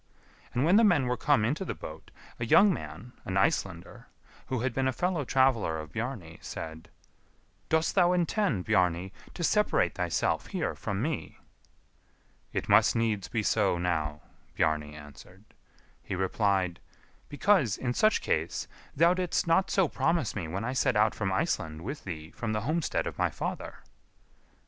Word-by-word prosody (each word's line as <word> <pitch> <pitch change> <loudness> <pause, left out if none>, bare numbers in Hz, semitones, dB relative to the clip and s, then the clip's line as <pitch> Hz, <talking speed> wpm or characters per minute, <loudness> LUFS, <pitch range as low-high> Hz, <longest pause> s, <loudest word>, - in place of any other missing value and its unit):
And 125 +4 +1
when 180 +5 +5
the 230 - +6
men 175 - +4
were 125 0 0
come 130 -2 +2
into 145 - -1
the - - -4
boat, 80 +1 -10 0.3
a 120 - -1
young 200 - +6
man, 125 -6 -8
an 95 - -2
Icelander, 95 -2 -1 0.4
who 130 -3 -2
had 130 -1 -1
been 130 +2 0
a - - +2
fellow 175 +3 -1
traveller 130 -11 +2
of 75 -1 -8
Bjarni, 110 -8 -5
said, 80 0 -7 0.8
"Dost 160 0 +2
thou 180 -2 +4
intend, 175 - 0
Bjarni, 90 -3 +1 0.2
to 170 - -4
separate 210 - +2
thyself - - -1
here 185 -5 -2
from 100 +1 -3
me." 155 0 -3 1.1
"It - - -3
must - - +5
needs 110 -4 0
be 110 -2 -2
so 100 -4 +2
now," 80 -4 -1 0.3
Bjarni 75 -1 0
answered. 75 +6 -13 0.6
He 95 - -5
replied, 95 -2 0 0.5
"Because, 145 - +2
in 125 -1 -2
such 215 +10 +3
case, - - -1 0.3
thou 170 +1 +5
didst 180 -2 0
not 170 +3 +3
so 190 -3 +3
promise 140 -4 0
me 90 -6 -3
when 95 +6 -4
I 125 - -2
set 130 - +1
out 105 +1 +3
from 95 -3 -2
Iceland 80 -4 -1
with 140 +9 -6
thee 80 -3 -6
from 110 0 -3
the 105 - -1
homestead 155 +7 -1
of - - -6
my - - +2
father." - - -6
115 Hz, 165 wpm, -29 LUFS, -, 1.1 s, the